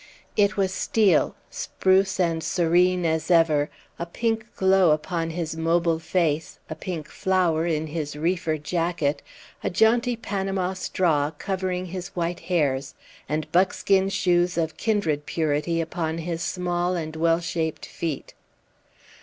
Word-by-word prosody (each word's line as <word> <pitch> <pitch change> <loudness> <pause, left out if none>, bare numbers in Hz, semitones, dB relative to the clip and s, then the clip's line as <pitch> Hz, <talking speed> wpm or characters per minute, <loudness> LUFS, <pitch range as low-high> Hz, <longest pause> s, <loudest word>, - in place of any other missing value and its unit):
It 205 -1 +3
was 190 -1 +1
Steel, 210 +1 +2 0.2
spruce 190 +1 +1
and 165 -3 +1
serene 180 +1 +2
as 160 +1 0
ever, 160 -4 +4 0.3
a 170 - -3
pink 225 +4 -1
glow 190 -2 +4
upon 165 +2 0
his 165 -1 -3
mobile 165 0 +1
face, 165 -2 -1
a - - 0
pink 160 -1 -5
flower 175 -4 +1
in 160 -2 0
his 150 -2 -4
reefer 165 0 0
jacket, 165 -1 -1 0.4
a - - +1
jaunty 235 +5 +3
Panama 195 -4 -2
straw 165 -5 +1
covering 185 +3 -3
his 180 0 -5
white 170 0 -1
hairs, 140 -7 0 0.3
and 155 +1 -2
buckskin 190 +1 +3
shoes 180 -2 +1
of 160 -1 -1
kindred 165 -10 0
purity 160 +1 0
upon 165 -1 -2
his 165 0 -3
small 175 0 -1
and 160 -2 -4
well 165 +1 +2
shaped 165 -2 -3
feet. 160 -4 -5
170 Hz, 135 wpm, -25 LUFS, 160-185 Hz, 0.4 s, ever